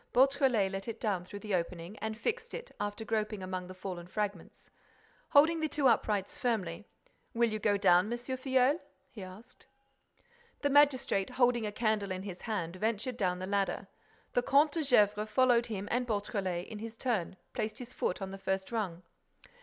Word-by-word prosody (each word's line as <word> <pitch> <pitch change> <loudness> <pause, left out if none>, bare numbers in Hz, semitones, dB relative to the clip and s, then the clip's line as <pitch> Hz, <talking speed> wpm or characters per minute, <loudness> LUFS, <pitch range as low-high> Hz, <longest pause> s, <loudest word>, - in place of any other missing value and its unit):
Beautrelet 260 -6 +4
let 195 +2 -5
it 230 -1 -5
down 200 -6 0
through 205 +3 -9
the 210 0 -5
opening 170 +1 -2
and 220 0 -3
fixed 465 - -2
it, - - -8
after 205 +2 -3
groping 215 -2 -1
among 185 -1 -4
the 185 - -9
fallen 185 -2 -6
fragments. 200 -2 -4 0.6
Holding 320 +3 +5
the 315 -1 0
two 290 -2 +2
uprights 210 -4 +1
firmly: 210 -5 -1 0.5
"Will 235 -1 +3
you 215 - -2
go 205 -1 +2
down, 180 +2 +4
M. 240 - 0
Filleul?" 260 +3 +1 0.3
he 215 - -9
asked. 190 +7 -12 1.0
The 285 - +2
magistrate, 270 -9 +4
holding 245 -3 +2
a - - -3
candle 215 -2 0
in 185 0 -3
his 190 -3 -7
hand, 185 -6 -3
ventured 225 +4 -1
down 180 -5 +1
the 185 - -4
ladder. 200 0 0 0.5
The 245 - +3
Comte 285 +4 +4
de 325 - -1
Gesvres 210 -5 +3
followed 240 +1 +4
him 205 -3 -4
and 245 +1 0
Beautrelet, 200 -5 -2
in 215 - -8
his 225 +1 -7
turn, 215 -8 -1 0.2
placed 215 0 -2
his 250 0 -8
foot 185 - -1
on 190 - -5
the 195 - -7
first 190 +1 -2
rung. 185 -7 -2
215 Hz, 180 wpm, -32 LUFS, 190-245 Hz, 1.0 s, Holding